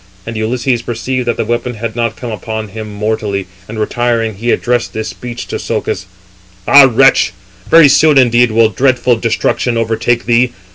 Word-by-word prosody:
And 115 Hz, -, -6 dB
Ulysses 120 Hz, +2 st, -1 dB
perceived 120 Hz, +2 st, -4 dB
that 120 Hz, -, -1 dB
the -, -, -1 dB
weapon 120 Hz, +1 st, -2 dB
had 115 Hz, +1 st, -5 dB
not 115 Hz, -1 st, -1 dB
come 120 Hz, -2 st, -7 dB
upon 110 Hz, +1 st, -5 dB
him 110 Hz, +2 st, -8 dB
mortally, 105 Hz, -2 st, -3 dB, 0.2 s
and 110 Hz, -, -8 dB
retiring, 115 Hz, 0 st, -1 dB
he 115 Hz, +5 st, -4 dB
addressed 120 Hz, 0 st, 0 dB
[this] 110 Hz, 0 st, -4 dB
speech 120 Hz, -1 st, -8 dB
to -, -, -4 dB
Socus: 95 Hz, -, -3 dB, 0.6 s
"Ah! 140 Hz, -1 st, +7 dB
wretch; 125 Hz, -6 st, +3 dB, 0.4 s
very 165 Hz, -2 st, +7 dB
soon 150 Hz, +1 st, +4 dB
indeed 120 Hz, -1 st, +4 dB
will 110 Hz, 0 st, +3 dB
dreadful 125 Hz, +2 st, +1 dB
destruction 115 Hz, +1 st, -1 dB
overtake 115 Hz, +1 st, -1 dB
thee. 120 Hz, +1 st, +2 dB
115 Hz, 165 wpm, -13 LUFS, 110-125 Hz, 0.6 s, Ah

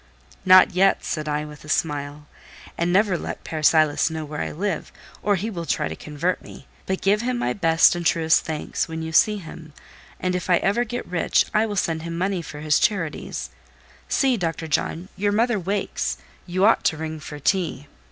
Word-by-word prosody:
"Not 185 Hz, +1 st, +8 dB
yet," 190 Hz, +2 st, +3 dB
said 155 Hz, -2 st, -3 dB
I, 150 Hz, 0 st, -1 dB
with 150 Hz, -1 st, -11 dB
a 155 Hz, -, -12 dB
smile. 145 Hz, -1 st, -2 dB, 0.5 s
"And 170 Hz, +1 st, 0 dB
never 190 Hz, -2 st, +3 dB
let -, -, -6 dB
Père 155 Hz, -1 st, -5 dB
Silas 155 Hz, 0 st, +4 dB
know 160 Hz, -1 st, -4 dB
where 150 Hz, 0 st, -5 dB
I -, -, -2 dB
live, 195 Hz, +5 st, -3 dB, 0.3 s
or 205 Hz, 0 st, +2 dB
he 210 Hz, +5 st, -3 dB
will 170 Hz, -4 st, -5 dB
try -, -, 0 dB
to 80 Hz, -, -6 dB
convert 155 Hz, -, -2 dB
me; -, -, -13 dB, 0.2 s
but 190 Hz, 0 st, -2 dB
give 205 Hz, +2 st, +3 dB
him 250 Hz, +1 st, -1 dB
my 240 Hz, -, 0 dB
best 165 Hz, -5 st, +4 dB
and 175 Hz, 0 st, -4 dB
truest 160 Hz, -1 st, +3 dB
thanks 155 Hz, -2 st, -3 dB
when 160 Hz, 0 st, -5 dB
you 160 Hz, -, -5 dB
see 210 Hz, +6 st, +4 dB
him, 160 Hz, -4 st, -10 dB, 0.5 s
and 185 Hz, 0 st, -1 dB
if 180 Hz, 0 st, -3 dB
ever 195 Hz, +5 st, +3 dB
I -, -, 0 dB
get 245 Hz, +2 st, -5 dB
rich 175 Hz, -1 st, +1 dB
I 215 Hz, +1 st, +3 dB
will 205 Hz, -, -4 dB
send 165 Hz, -4 st, -1 dB
him 170 Hz, 0 st, -5 dB
money 185 Hz, 0 st, -1 dB
for 150 Hz, -2 st, -9 dB
his 150 Hz, -1 st, +2 dB
charities. 180 Hz, -9 st, -2 dB, 0.6 s
See, 265 Hz, -3 st, +2 dB
Dr. 165 Hz, -3 st, -3 dB
John, 165 Hz, +4 st, -2 dB
your 205 Hz, +1 st, 0 dB
mother 230 Hz, 0 st, +2 dB
wakes; 195 Hz, +2 st, -2 dB, 0.3 s
you 185 Hz, +2 st, +1 dB
ought 225 Hz, -, +4 dB
to 160 Hz, -, +2 dB
ring 160 Hz, 0 st, -5 dB
for 150 Hz, -1 st, -8 dB
tea." 160 Hz, -1 st, -1 dB
170 Hz, 200 wpm, -23 LUFS, 155-195 Hz, 0.6 s, Not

